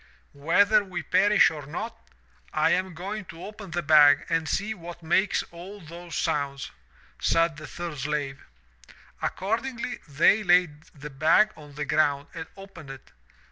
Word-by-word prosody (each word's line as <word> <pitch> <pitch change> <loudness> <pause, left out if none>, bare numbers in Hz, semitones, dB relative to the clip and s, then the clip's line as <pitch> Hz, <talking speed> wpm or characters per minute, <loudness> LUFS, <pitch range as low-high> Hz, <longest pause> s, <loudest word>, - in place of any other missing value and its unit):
'Whether 200 +9 +3
we 180 -4 -6
perish 205 +4 +4
or 150 -3 -8
not, 215 +10 -5 0.6
I - - +2
am 185 -1 0
going 200 +4 -5
to 165 0 -11
open 210 -1 -10
the 175 +1 -3
bag 150 -1 +6
and 165 -1 0
see 215 +3 -1
what 175 -3 -10
makes 190 +5 +1
all 185 +5 -10
those 170 0 -10
sounds,' 140 -1 -2 0.5
said 165 -2 +2
the 155 -1 -9
third 170 -4 -6
slave. 140 0 -3 0.8
''Accordingly, 235 +4 -3
they 155 +9 +4
laid 175 -5 +2
the 150 -1 -11
bag 160 +10 +4
on 145 -2 -14
the 150 +1 -3
ground 145 -1 +1
and 165 -1 -7
opened 195 -7 -12
it. 135 -1 -11
165 Hz, 150 wpm, -26 LUFS, 150-195 Hz, 0.8 s, bag